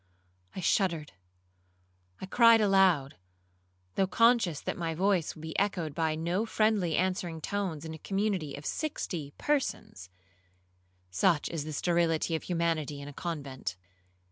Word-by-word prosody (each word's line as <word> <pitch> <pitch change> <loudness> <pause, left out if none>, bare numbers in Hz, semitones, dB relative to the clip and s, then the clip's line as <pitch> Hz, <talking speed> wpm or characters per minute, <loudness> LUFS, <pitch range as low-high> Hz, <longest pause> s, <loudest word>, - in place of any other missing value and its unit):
I 185 - -4
shuddered,—I 90 - -4
cried 230 +3 +6
aloud, 190 -9 +3 0.8
though 190 - +1
conscious 230 -7 +3
that - - -4
my 165 -2 -3
voice 185 -2 +1
would 155 - -12
be 160 +3 -3
echoed 180 -6 -1
by 160 -1 0
no 170 +6 -1
friendly 215 -7 +1
answering 180 -3 -1
tones 170 -3 -3
in 160 - -6
a 160 - -9
community 195 -7 -1
of 145 - -10
sixty 175 - -3
persons,—such 270 - -2 1.4
is 160 -3 -4
the 155 - -5
sterility 165 0 +1
of 160 - -2
humanity 165 -4 -1
in 140 - -8
a - - -10
convent. 135 - -5
165 Hz, 130 wpm, -30 LUFS, 145-190 Hz, 1.4 s, cried